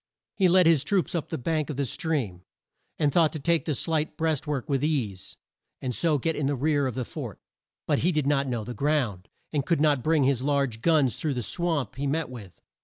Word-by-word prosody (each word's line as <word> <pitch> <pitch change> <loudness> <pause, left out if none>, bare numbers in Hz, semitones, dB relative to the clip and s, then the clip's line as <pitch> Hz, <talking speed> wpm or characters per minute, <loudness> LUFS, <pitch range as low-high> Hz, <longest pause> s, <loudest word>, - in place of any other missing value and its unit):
He 190 - +4
led 180 0 +5
his 160 -4 +5
troops 190 +4 0
up 170 -4 -2
the - - -3
bank 155 +4 -1
of 150 - -3
the 140 +1 -1
stream, 125 - -2 0.6
and 145 -3 +1
thought 165 -3 +4
to 155 - -4
take 170 +3 +1
the 155 - 0
slight 155 +2 -1
breast 160 -2 0
work 145 -2 -2
with 140 -2 0
ease, 120 -12 -2 0.4
and 125 -1 -3
so 155 +3 +2
get 160 +4 -1
in 145 - -1
the 145 - 0
rear 145 +1 +1
of 125 - -4
the 130 -2 -2
fort. - - -7 0.5
But - - +1
he 175 - +2
did 150 -4 0
not 140 -1 +2
know 120 -4 -2
the 125 - -6
ground, 130 -10 -1 0.2
and 145 -2 +1
could 170 +3 +1
not 145 -3 +3
bring 155 +1 +2
his 130 -2 +2
large 140 -5 0
guns 145 -6 +3
through 150 -4 -2
the 125 - -2
swamp 155 - -2
he 140 +1 -1
met 150 -1 -1
with. 105 -8 -11
145 Hz, 230 wpm, -26 LUFS, 130-160 Hz, 0.6 s, led